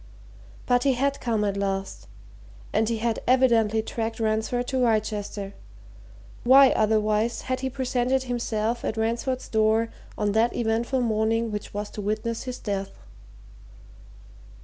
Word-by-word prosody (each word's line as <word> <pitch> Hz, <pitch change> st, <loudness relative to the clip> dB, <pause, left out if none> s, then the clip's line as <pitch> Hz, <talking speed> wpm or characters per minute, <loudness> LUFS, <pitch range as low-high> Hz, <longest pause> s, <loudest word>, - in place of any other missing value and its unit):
But 245 Hz, -1 st, +3 dB
he 275 Hz, 0 st, +3 dB
had 280 Hz, +3 st, 0 dB
come, 225 Hz, -3 st, 0 dB
at 200 Hz, -1 st, 0 dB
last, 195 Hz, -1 st, -3 dB, 0.7 s
and 220 Hz, 0 st, +2 dB
he 230 Hz, -, 0 dB
had 225 Hz, 0 st, -1 dB
evidently 230 Hz, -4 st, +3 dB
tracked 225 Hz, 0 st, -4 dB
Ransford 220 Hz, +3 st, 0 dB
to 265 Hz, -, -1 dB
Wrychester 210 Hz, -3 st, -1 dB, 0.9 s
why, 265 Hz, +2 st, +7 dB
otherwise, 215 Hz, +1 st, +1 dB
had 255 Hz, 0 st, -2 dB
he 265 Hz, 0 st, -2 dB
presented 260 Hz, 0 st, 0 dB
himself 235 Hz, -2 st, -2 dB
at 220 Hz, -, -2 dB
Ransford's 235 Hz, +3 st, -1 dB
door 220 Hz, +1 st, +2 dB, 0.3 s
on 210 Hz, -1 st, 0 dB
that 225 Hz, +3 st, +2 dB
eventful 235 Hz, +3 st, 0 dB
morning 225 Hz, 0 st, +1 dB
which 210 Hz, -1 st, -5 dB
was 205 Hz, 0 st, -4 dB
to 210 Hz, -, -6 dB
witness 215 Hz, +3 st, -2 dB
his 255 Hz, -1 st, -5 dB
death? 195 Hz, -2 st, -4 dB
225 Hz, 135 wpm, -25 LUFS, 215-245 Hz, 0.9 s, why